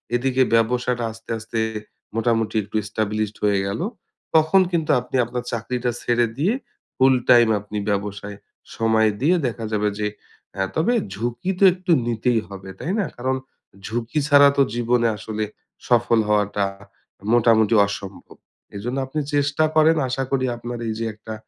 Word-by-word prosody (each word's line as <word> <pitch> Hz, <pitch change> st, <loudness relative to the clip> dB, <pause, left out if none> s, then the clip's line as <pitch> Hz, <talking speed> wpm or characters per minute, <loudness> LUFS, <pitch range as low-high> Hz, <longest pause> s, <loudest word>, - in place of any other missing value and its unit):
এদিকে 130 Hz, +1 st, +1 dB
ব্যবসাটা 120 Hz, +1 st, +1 dB
আস্তে, 115 Hz, +1 st, -16 dB
আস্তে 115 Hz, +1 st, -4 dB, 0.6 s
মোটামুটি 115 Hz, -1 st, 0 dB
একটু 105 Hz, +2 st, -11 dB
established 105 Hz, 0 st, -2 dB
হয়ে 100 Hz, -2 st, +3 dB
গেল। 100 Hz, +9 st, -3 dB, 0.5 s
তখন 160 Hz, +5 st, +5 dB
কিন্তু 165 Hz, -3 st, 0 dB
আপনি 125 Hz, +2 st, -7 dB
আপনার 125 Hz, +1 st, -4 dB
চাকরিটা 120 Hz, +2 st, -2 dB
ছেড়ে 120 Hz, 0 st, +2 dB
দিয়ে 180 Hz, +10 st, +2 dB, 0.4 s
full-time 125 Hz, -3 st, +5 dB
আপনি 105 Hz, +1 st, -7 dB
ব্যবসায়ে 100 Hz, 0 st, -3 dB, 0.4 s
সময় 110 Hz, -1 st, +3 dB
দিয়ে 165 Hz, +6 st, +4 dB
দেখা 115 Hz, -1 st, -5 dB
যাবে 105 Hz, -1 st, +1 dB
যে 105 Hz, -, 0 dB, 0.5 s
অ্যা 95 Hz, +1 st, -1 dB
তবে 165 Hz, +10 st, +2 dB, 0.2 s
ঝুঁকি 120 Hz, -, -3 dB
তো -, -, +3 dB
একটু 185 Hz, -1 st, -3 dB, 0.2 s
নিতেই 115 Hz, 0 st, +1 dB
হবে, 95 Hz, -1 st, -9 dB
তাই 165 Hz, -, -3 dB
না? 200 Hz, -, +1 dB
কারণ 130 Hz, +2 st, -1 dB, 0.5 s
ঝুঁকি 120 Hz, +6 st, -2 dB
ছাড়া 145 Hz, -1 st, +7 dB
তো 140 Hz, -, +5 dB
জীবনে 120 Hz, 0 st, +2 dB
আসলে 110 Hz, 0 st, -4 dB, 0.4 s
সফল 120 Hz, -1 st, +3 dB
হওয়াটা 105 Hz, -1 st, +1 dB, 0.7 s
মোটামুটি 115 Hz, -2 st, +4 dB
অসম্ভব। 100 Hz, -1 st, -8 dB, 0.4 s
এইজন্য 120 Hz, +6 st, -4 dB
আপনি 155 Hz, +4 st, -3 dB
চেষ্টা 145 Hz, +1 st, +1 dB
করেন, 160 Hz, +1 st, +5 dB
আশা 135 Hz, +1 st, -1 dB
করি 130 Hz, -1 st, +1 dB
আপনার 120 Hz, 0 st, -6 dB
এই 110 Hz, -, -1 dB
যে 115 Hz, -, -2 dB
একটা 110 Hz, +1 st, -9 dB
120 Hz, 150 wpm, -22 LUFS, 110-130 Hz, 0.7 s, ছাড়া